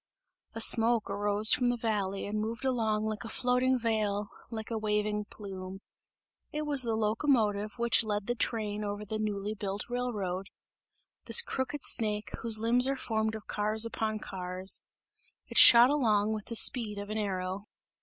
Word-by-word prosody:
A - - -5
smoke 230 0 +3
arose 205 +1 +4
from 250 - +1
the 245 0 -1
valley 205 -4 -3
and 210 +1 -4
moved 230 +4 -6
along 220 -4 -1
like 215 0 -5
a 230 - -8
floating 250 +2 0
veil, 215 -3 -2 0.2
like 220 -1 -8
a 225 - -2
waving 210 0 -2
plume; 190 -2 -10 0.7
it 300 +1 -4
was 290 -3 +1
the 230 -2 -1
locomotive 215 -2 -1
which 235 0 +3
led 210 -2 -4
the 240 - -2
train 210 -2 -3
over 205 0 -6
the 215 +1 -5
newly 210 -1 -4
built 200 -1 -6
railroad 205 -7 -4 0.8
this - - +6
crooked 270 +1 -5
snake, 210 -1 0
whose 230 -2 +2
limbs 240 +3 +2
are 275 - -1
formed 220 -3 -3
of 220 - -10
cars 215 +2 -1
upon 220 -1 -4
cars. 185 -2 -2 0.6
It - - +1
shot 240 +2 +9
along 220 -7 0
with 215 -2 -6
the 230 - -7
speed 220 -3 +7
of 205 +1 -7
an 215 - -3
arrow. 190 0 -5
215 Hz, 165 wpm, -28 LUFS, 205-230 Hz, 0.8 s, shot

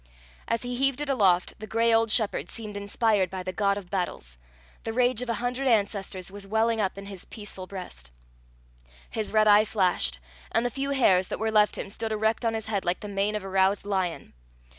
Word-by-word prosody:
As 230 +1 -1
he 245 0 -3
heaved 275 +1 +1
it 295 - -3
aloft, 190 -9 +2
the 215 - -7
gray 230 +2 +2
old 225 0 +3
shepherd 215 -1 +2
seemed 215 -2 -6
inspired 200 -1 +1
by 185 0 -5
the 185 - -4
god 200 +1 +1
of 190 -3 -9
battles; - - -3 0.4
the 225 - -3
rage 250 0 +2
of 250 - -4
a 230 - +1
hundred 245 +3 -2
ancestors 200 -5 0
was 200 0 -7
welling 220 +2 +1
up 195 -1 -1
in 200 - -7
his 195 -2 -8
peaceful 200 -3 -9
breast. 180 - -9 1.0
His 220 -2 -3
red 215 0 +4
eye 210 0 +7
flashed, 180 - +1 0.3
and 230 +2 +1
the 245 - 0
few 275 +2 -3
hairs 190 -10 +3
that - - -3
were 220 0 -1
left 210 -1 +3
him 195 - -5
stood 220 +1 -4
erect 220 +2 0
on 225 -1 +1
his 220 -1 -4
head 205 -3 -1
like 175 +1 -1
the 210 - -6
mane 200 +1 -1
of 210 - -3
a 195 - -6
roused 195 +1 +2
lion. 190 -4 -2
210 Hz, 215 wpm, -27 LUFS, 190-225 Hz, 1.0 s, eye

